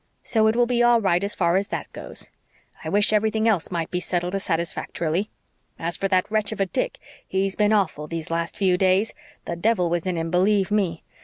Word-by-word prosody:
So 220 -2 +2
it 220 - +2
will 240 0 +4
be 240 0 +1
all 240 -1 +5
right 190 -3 +1
as 205 +1 -2
far 170 0 +2
as 200 +1 -1
THAT - - -5
goes. - - -3 0.5
I - - -4
wish 205 +1 +2
everything 220 +1 +2
else 200 -8 +2
might 170 -3 -3
be 180 - 0
settled 180 0 -2
as 195 - -1
satisfactorily. 170 +2 -1 0.5
As 170 +1 -1
for 195 - -1
that 185 +1 +1
wretch 215 -1 0
of 215 - -6
a 195 - +3
Dick, - - -2 0.3
he's 195 0 0
been 210 0 +2
awful 175 -8 +1
these 165 0 -5
last 170 0 -2
few 185 -3 +3
days. 190 +3 +2 0.3
The 170 - -3
devil 180 -2 +1
was 175 +1 -1
in 180 - 0
him, 165 0 -2
believe 195 +2 +2
ME! 190 -6 0
190 Hz, 220 wpm, -24 LUFS, 170-210 Hz, 0.5 s, all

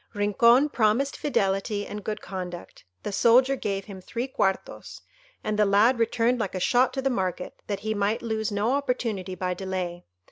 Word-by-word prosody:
Rincon 235 +7 +4
promised 240 +3 +1
fidelity 205 -5 0
and 210 0 -7
good 215 +1 -4
conduct; 180 -2 -7 0.2
the - - -3
soldier 250 +6 +4
gave 195 -6 -3
him 195 -2 -9
three 235 +7 -4
quartos, 195 -7 -2 0.4
and 215 0 -2
the 210 - +5
lad 220 +5 +4
returned 230 +2 +1
like 200 -4 -3
a - - -1
shot 245 +7 +3
to 265 - -3
the 270 - +1
market, 185 -5 -3
that 200 -2 -3
he 220 +1 -1
might 205 +2 -1
lose 220 -2 -2
no 205 +4 0
opportunity 235 -9 -2
by 185 0 -2
delay. 180 -2 -4
210 Hz, 175 wpm, -26 LUFS, 195-240 Hz, 0.4 s, the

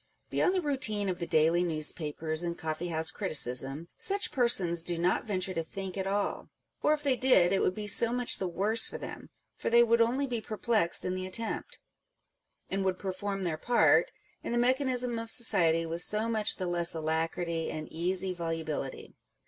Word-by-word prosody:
Beyond 370 - +1
the 365 - 0
routine 215 -9 0
of 180 - -3
the 170 - -4
daily 165 +2 +3
newspapers 155 -1 0
and 170 -1 -3
coffee 160 +2 -4
house 160 -1 +1
criticism, 140 - 0
such 400 0 +1
persons 190 -10 +2
do 170 0 -1
not 175 +6 0
venture 185 -2 -1
to 165 - -2
think 190 +3 -7
at 190 -1 -3
all: 200 +1 -2 0.3
or 300 - +3
if 300 -1 -3
they 275 -3 +2
did, 245 -9 +4
it 195 - +1
would 185 - 0
be 215 - -5
so 225 +3 +3
much 245 0 +2
the 190 - -2
worse 210 +6 +1
for - - -7
them, - - -9 0.3
for - - -3
they 235 +1 +6
would 230 0 +3
only 250 +5 +1
be 240 -4 -3
perplexed 215 -4 0
in 180 - -1
the 185 0 -4
attempt, 225 +4 -2 0.9
and 195 0 -2
would 190 -1 -1
perform 195 +1 -4
their 160 -3 -2
part 245 - +3 0.3
in - - -5
the 240 - 0
mechanism 250 -1 +1
of 230 0 -7
society 170 -9 +2
with 165 +1 -3
so 215 +4 +1
much 220 -2 +2
the 185 - -4
less 175 -1 +1
alacrity 165 +1 -2
and 155 0 -6
easy 185 +3 +1
volubility. 165 -5 -5
185 Hz, 190 wpm, -29 LUFS, 165-230 Hz, 0.9 s, they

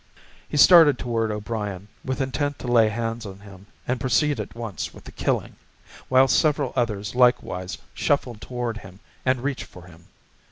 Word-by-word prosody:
He - - -2
started 150 -3 +8
toward 115 -2 -1
O'Brien, 105 -2 -4 0.2
with 130 +1 -2
intent 145 +2 -2
to - - -8
lay 115 -3 +4
hands 115 +1 -3
on 100 -2 -9
him 100 -1 -14 0.2
and 125 0 -1
proceed 130 +4 +1
at - - -6
once 115 -7 -5
with - - -13
the - - -11
killing, - - -2 0.5
while 130 +1 +5
several 145 -1 +2
others 105 -4 -1
likewise 120 -7 +1 0.2
shuffled 125 -6 -1
toward 120 0 -4
him 95 -1 -13 0.3
and 130 -1 +1
reached 135 -1 -2
for 90 - -14
him. 85 -1 -17
120 Hz, 165 wpm, -24 LUFS, 105-130 Hz, 0.5 s, started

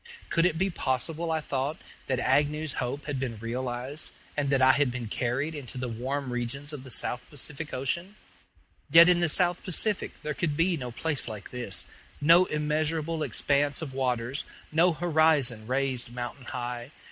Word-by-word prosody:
Could 165 +1 +4
it 165 -3 -1
be 190 +3 +1
possible, 160 +4 -1
I 160 -1 0
thought, 140 +1 -2 0.3
that 130 - +1
Agnew's 145 +4 +1
hope 135 +4 -3
had 145 -3 -3
been 125 -4 -3
realized, 125 +5 -4 0.3
and 145 -2 0
that 135 -1 +3
I 130 0 +7
had 140 0 +3
been 125 -1 -4
carried 125 +7 -1
into 135 -4 -6
the 125 0 -2
warm 130 +3 -3
regions 135 +5 -3
of 140 -3 -7
the 130 - -10
South 125 0 +2
Pacific 145 +2 -4
Ocean? 170 +10 -2 0.7
Yet 165 +3 +9
in 180 -1 +5
the 175 -2 +3
South 175 +2 +2
Pacific 200 +2 0
there 150 0 -2
could 150 -1 -1
be 170 +2 +3
no 125 -5 -5
place 145 +3 +1
like 105 -3 -7
this 100 -8 -3 0.3
no 170 +5 +6
immeasurable 155 +1 -1
expanse 145 +2 +1
of 135 -4 -6
waters, 130 0 -1 0.3
no 170 +3 +4
horizon 155 -9 +2
raised 130 -1 -1
mountain 120 +2 -6
high. 120 0 -5
140 Hz, 170 wpm, -28 LUFS, 125-160 Hz, 0.7 s, Yet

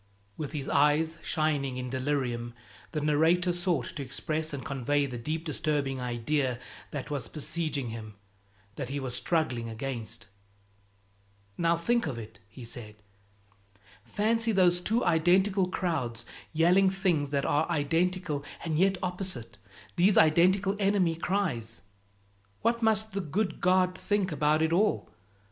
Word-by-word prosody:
With 150 -1 -5
his 140 -3 -4
eyes 155 +3 +3
shining 145 -5 0
in 125 -1 -4
delirium, 130 -3 -2 0.4
the 155 - -2
narrator 165 +4 +3
sought 175 -7 0
to - - -3
express 155 +4 -2
and 140 -2 -6
convey 140 0 0
the 125 -3 -5
deep 155 +7 -3
disturbing 145 -3 -1
idea 125 +2 -1 0.3
that 145 0 -6
was 135 -6 -2
besieging 155 -3 -3
him, 110 -2 -8 0.6
that 125 - -4
he 140 +1 -2
was 130 -2 -4
struggling 125 -5 0
against. 115 -1 -5 1.3
"Now 170 0 +2
think 235 +3 +1
of 130 -5 -3
it!" 110 0 -9
he 120 +4 -11
said. 110 -2 -5 1.1
"Fancy 225 - +1
those 180 -3 +4
two 225 +6 +1
identical 185 +4 +3
crowds 145 - -2 0.3
yelling 180 +4 +4
things 180 -7 0
that 140 -1 0
are 150 +3 +1
identical 165 0 0 0.2
and 160 -1 0
yet 190 +1 +3
opposite, 180 - -3 0.4
these 190 +3 +4
identical 185 +5 +4
enemy 195 -4 +2
cries! 160 - -2 0.8
What 235 0 +2
must 220 -1 +2
the 195 0 -2
good 190 +5 -2
God 185 0 +3
think 200 -1 0
about 150 +1 +2
it 160 +1 +1
all? 205 +5 +2
155 Hz, 135 wpm, -29 LUFS, 135-180 Hz, 1.3 s, those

